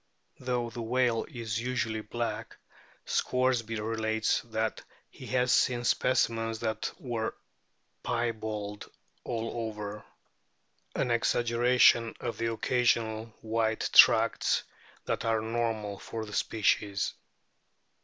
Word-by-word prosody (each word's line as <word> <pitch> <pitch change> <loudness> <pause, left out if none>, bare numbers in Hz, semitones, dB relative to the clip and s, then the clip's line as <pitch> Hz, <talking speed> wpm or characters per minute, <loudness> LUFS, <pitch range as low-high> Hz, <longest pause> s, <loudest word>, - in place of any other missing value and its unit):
Though 125 -2 -2
the 120 - -6
whale 120 0 +1
is 115 -2 -3
usually 115 -3 -1
black, 120 +2 -4 0.5
Scoresby 125 -3 0
relates 110 0 0
that 110 -1 -2 0.3
he - - -11
has 125 0 +2
seen 120 -1 +2
specimens 115 -2 +1
that 110 -2 -2
were 115 -3 -3 0.7
piebald 110 -3 -3 0.3
all 115 -1 -3 0.2
over 105 -1 -7 0.9
an 125 - 0
exaggeration 120 0 +3
of 120 - -4
the 115 0 0
occasional 115 -2 +1 0.2
white 110 0 0
tracts - - +6 0.4
that - - -1
are 115 -1 +2
normal 110 -2 -2
for 110 -1 -5
the 105 - -10
species. 100 -2 +1
115 Hz, 105 wpm, -29 LUFS, 110-120 Hz, 0.9 s, tracts